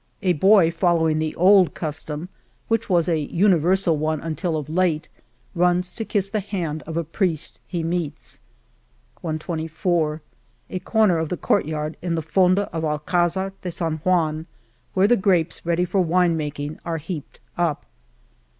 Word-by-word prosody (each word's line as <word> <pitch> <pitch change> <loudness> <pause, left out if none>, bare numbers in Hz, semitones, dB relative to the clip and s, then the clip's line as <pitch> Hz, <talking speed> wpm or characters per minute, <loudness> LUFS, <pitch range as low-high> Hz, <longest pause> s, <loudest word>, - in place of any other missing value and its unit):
A 185 -2 +3
boy, 190 +1 +5
following 165 -2 +2
the 155 0 -2
old 185 0 +5
custom, 155 +1 -4 0.4
which 225 -1 0
was 175 -3 +3
a 165 -3 +2
uni 175 +5 +3
versal 175 0 +2
one 155 +1 -1
until 165 +2 -2
of 150 -2 -5
late, 160 -1 0 0.4
runs 180 0 +1
to 225 - -4
kiss 205 -3 -1
the 215 +2 -2
hand 175 -7 -3
of 160 0 -4
a 170 - 0
priest 165 -1 -2
he 170 -3 -3
meets, 160 - -3 0.8
122 160 0 -1 0.5
A 185 - -2
corner 210 -5 +2
of 160 -1 -2
the 180 - -2
court - - +1
yard 155 0 -3
in 170 -1 -1
the 160 - -2
fonda 185 +4 +3
of 165 - -2
Alcdzar 175 +5 0
de 180 - -4
San 165 -2 -2
Juan, 160 -1 0 0.5
where 190 +1 +4
the 245 - +5
grapes 185 -5 +1
ready 170 +1 +2
for 185 +2 +1
wine 175 0 +2
making 150 -1 -4
are 165 -1 -2
heaped 155 -1 -7 0.2
up 170 -4 -1
170 Hz, 160 wpm, -23 LUFS, 155-185 Hz, 0.8 s, boy